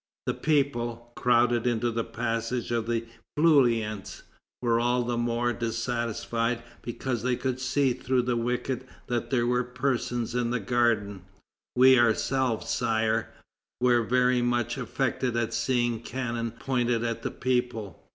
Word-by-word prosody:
The - - 0
people, 120 -6 -1
crowded 120 -1 +3
into 120 0 +1
the 115 0 -1
passage 115 +1 -2
of 115 -1 0
the 115 -1 -1 0.3
Feuillants, 120 - +2 0.4
were 115 -2 +2
all 120 +1 +2
the 120 0 -1
more 120 +1 0
dissatisfied 115 0 -2 0.2
because 120 0 -3
they 125 +1 +1
could 130 0 -2
see 130 0 +1
through 125 0 0
the 125 0 0
wicket 125 +2 -2 0.2
that 120 -2 -2
there 120 -3 +2
were 125 +1 +2
persons 125 -2 -2
in 120 -1 0
the 120 0 0
garden. 110 -3 +1 0.5
We 130 0 +7
ourselves, 120 +1 +1
Sire, 110 0 +1 0.5
were 120 -1 +4
very 125 +2 +2
much 120 -1 0
affected 125 -2 -1
at 115 -1 -1
seeing 120 -3 +1
cannon 115 -1 -3
pointed 120 -1 -1
at 115 -1 -2
the - - -2
people. 125 -5 -2
120 Hz, 140 wpm, -27 LUFS, 115-125 Hz, 0.5 s, We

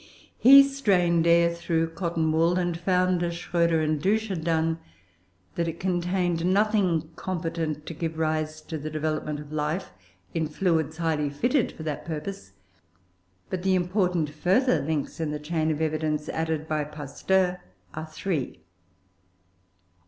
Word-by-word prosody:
He 275 +3 +10
strained 185 -12 +2
air 170 0 +5
through 165 -1 -1
cotton 165 -2 -1
wool, 165 +3 +3
and 175 -2 0
found, 180 0 +1
as 170 -1 -1
Schroeder 170 -2 +1
and 155 -1 0
Dusch 215 +5 +1
had 175 -5 -3
done, 165 0 +1 0.7
that 170 -1 -1
it 165 0 -5
contained 180 -1 0
nothing 185 -4 +2
competent 165 -4 -3
to - - -6
give 160 0 -4
rise 155 -1 -1
to 160 -2 -5
the 155 +2 -5
development 155 -1 -2
of 150 0 -10
life 155 - -2 0.4
in 160 -1 0
fluids 160 -1 0
highly 155 -3 0
fitted 245 - +1
for 160 - -9
that 150 -2 -4
purpose. 155 - -6 1.0
But 185 - -2
the 190 0 +2
important 180 -4 0
further 180 - +2
links 150 +1 -3
in 160 -2 -1
the 150 - -2
chain 155 +1 -1
of 155 0 -1
evidence 155 -1 -1
added 160 -1 -2
by 155 -1 -1
Pasteur 180 +5 -1 0.3
are 155 +1 -5
three. 155 -3 -3
165 Hz, 145 wpm, -26 LUFS, 155-180 Hz, 1.0 s, He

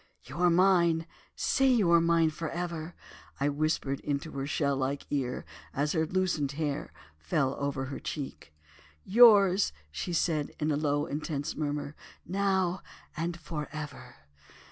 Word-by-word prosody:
'You 135 +5 -10
are 180 0 +5
mine, 170 -2 +4 0.3
say 270 - +2
you 225 -9 +4
are 170 -1 +6
mine 165 -1 +3
for 155 0 -4
ever!' 170 -1 -4 0.4
I 140 +1 +2
whispered 145 -2 -1
into 145 +2 -3
her 135 0 -4
shell 140 -1 0
like 135 +1 -2
ear 130 -3 -2 0.3
as 145 +2 +1
her 160 -2 +1
loosened 175 -6 0
hair 145 -1 -3 0.3
fell 130 - 0
over 140 -2 -2
her 135 +1 -6
cheek. 140 - -6 0.5
"'Yours,' 200 -3 +6 0.2
she 175 - -4
said 160 -3 0
in 155 0 0
a - - +2
low 145 0 0
intense 145 -1 -3
murmur, 145 -1 -3 0.3
'now 190 -1 0 0.3
and 170 +2 -3
for 155 -3 -5
ever. 150 -2 -8
155 Hz, 145 wpm, -29 LUFS, 145-175 Hz, 0.5 s, are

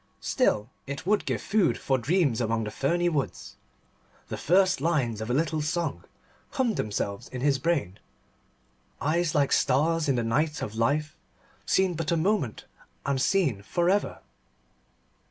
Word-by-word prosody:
Still, 105 +4 0 0.2
it 140 +2 -5
would 210 +2 +2
give - - -2
food 205 -1 +2
for 130 -1 0
dreams 140 -2 +1
among 115 0 0
the 105 - -4
ferny 170 +10 0
woods. 150 -6 -3 0.7
The - - -3
first 185 -1 +3
lines 135 -9 0
of 110 - -4
a - - +1
little 155 +1 0
song 160 0 -2 0.5
hummed 255 -6 0
themselves 100 +2 -3
in 125 - -6
his 140 -1 +2
brain 135 - -1 1.0
"Eyes 165 +2 0
like 140 -2 +2
stars 155 +4 +2
in 135 - +3
the 120 - 0
night 150 +7 0
of 105 - -5
life, 145 +7 0 0.5
Seen 190 -1 +2
but 165 -1 -2
a 170 - +2
moment 170 - 0 0.4
and 140 -1 0
seen 140 - +1
for 175 - +1
ever." 205 +1 -1
150 Hz, 155 wpm, -27 LUFS, 120-170 Hz, 1.0 s, first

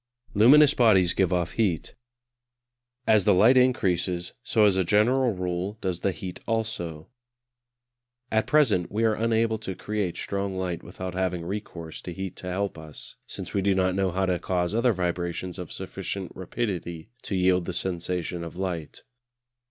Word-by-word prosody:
Luminous 140 +8 +7
bodies 95 -8 +4
give 95 -2 +1
off 90 -2 0
heat. 95 -9 -1 1.1
As 110 -3 +4
the 105 - +5
light 110 +8 +6
increases, 90 -8 +1
so 110 -3 +3
as 100 -2 +4
a 95 - +2
general 120 +7 +3
rule 90 +3 -3
does 90 -4 -2
the 100 - +1
heat 90 +1 -7
also. 95 -9 -3 1.2
At 110 0 +1
present 120 - +3
we 110 +3 0
are 110 -1 +4
unable 110 0 +1
to 95 -4 -5
create 105 -4 -3
strong 100 -1 -3
light 90 -2 -2
without 90 +1 -7
having 90 -2 -1
recourse 85 -4 -6
to 90 - -6
heat 95 0 -5
to 90 - -7
help 95 -2 -2
us, 80 -2 -10
since - - -7
we 100 - +1
do 100 0 +2
not 95 -1 +2
know 95 0 +1
how 95 +2 0
to 90 -2 0
cause 90 +1 -1
other 120 +2 +3
vibrations 90 0 -3
of 90 - -7
sufficient 95 -3 -5
rapidity 95 -2 -4
to 100 - -4
yield 90 -1 +3
the 90 - -3
sensation 90 -1 -2
of 85 +1 -8
light. 90 -5 -4
95 Hz, 165 wpm, -26 LUFS, 90-105 Hz, 1.2 s, Luminous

